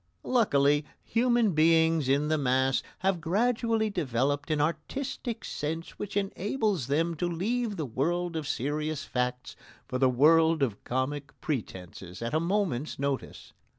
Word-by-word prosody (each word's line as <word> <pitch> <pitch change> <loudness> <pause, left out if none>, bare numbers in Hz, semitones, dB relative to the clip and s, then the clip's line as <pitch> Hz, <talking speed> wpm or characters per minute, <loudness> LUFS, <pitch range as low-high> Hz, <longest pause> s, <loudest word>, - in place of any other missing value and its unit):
Luckily, 145 - +3 0.2
human 235 -2 +2
beings 160 -2 +3
in 140 +2 +2
the 155 - +2
mass 130 0 +2 0.2
have 190 -3 +2
gradually 220 +4 +1
developed 145 -3 -1
an 155 -1 +1
artistic 225 - -3
sense 160 +3 -4
which 205 0 -4
enables 200 - -1
them 165 +4 +1
to 175 - 0
leave 215 +6 -1
the 155 - -3
world 170 +8 -1
of 155 -2 -3
serious 150 +3 -2
facts 125 0 -2 0.3
for 125 - -3
the 130 -1 +4
world 160 +4 +4
of 110 -6 -2
comic 135 +2 -3
pretences 95 - -5
at 115 - -3
a 155 - +3
moment's 170 -6 -1
notice. 140 -1 -4
155 Hz, 140 wpm, -28 LUFS, 135-195 Hz, 0.3 s, the